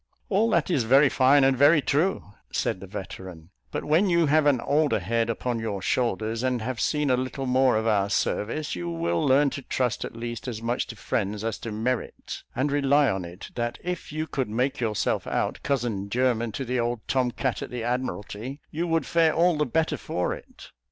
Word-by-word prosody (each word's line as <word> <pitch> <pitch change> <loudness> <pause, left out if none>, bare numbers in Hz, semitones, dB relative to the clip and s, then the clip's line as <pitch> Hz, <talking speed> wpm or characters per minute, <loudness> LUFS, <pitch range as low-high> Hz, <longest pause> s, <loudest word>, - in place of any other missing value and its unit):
"All 215 +2 +3
that 200 - +1
is 140 - +2
very 135 +5 +5
fine, 135 +2 +5
and 135 0 +4
very 145 +5 +6
true," 145 - 0 0.2
said - - -1
the 95 - -9
veteran; 95 -4 -8 0.2
"but - - -4
when 170 +7 +3
you 170 -1 +4
have 150 +1 +3
an 140 -4 +4
older 145 +4 +2
head 115 +4 0
upon 115 +1 -2
your 110 -3 -3
shoulders, 115 +1 -1
and 130 -1 0
have 120 +1 -3
seen 150 -3 +1
a - - +5
little 130 +2 -3
more 130 -2 +3
of 110 - -1
our 100 -3 +2
service, 120 +8 -1
you 85 -1 -4
will 85 0 -1
learn 140 +1 +4
to 140 - -5
trust 125 -2 -1
at - - -7
least 120 +1 -5
as 115 -4 -4
much 120 +2 -1
to 115 - -8
friends 105 -1 -2
as 115 -1 -2
to 115 - -6
merit; 115 +3 -3
and 135 +4 0
rely 145 0 +3
on 95 -1 -2
it, 85 +3 -9
that 120 0 -2
if 180 -3 -4
you 155 +1 -2
could 130 -7 -2
make 125 +5 0
yourself 110 -4 -1
out - - -1
cousin 115 -8 -1
german 120 -1 +1
to 135 - -3
the 125 +1 -1
old 120 -1 -1
tom 130 -2 +1
cat 130 +1 -2
at - - -5
the 125 -2 -5
Admiralty, 125 +1 -3
you 170 +3 -2
would 165 -1 +1
fare 165 -2 +3
all 170 +1 +4
the 150 0 0
better 155 +4 0
for 90 -6 -2
it. - - -12
125 Hz, 210 wpm, -26 LUFS, 110-145 Hz, 0.2 s, very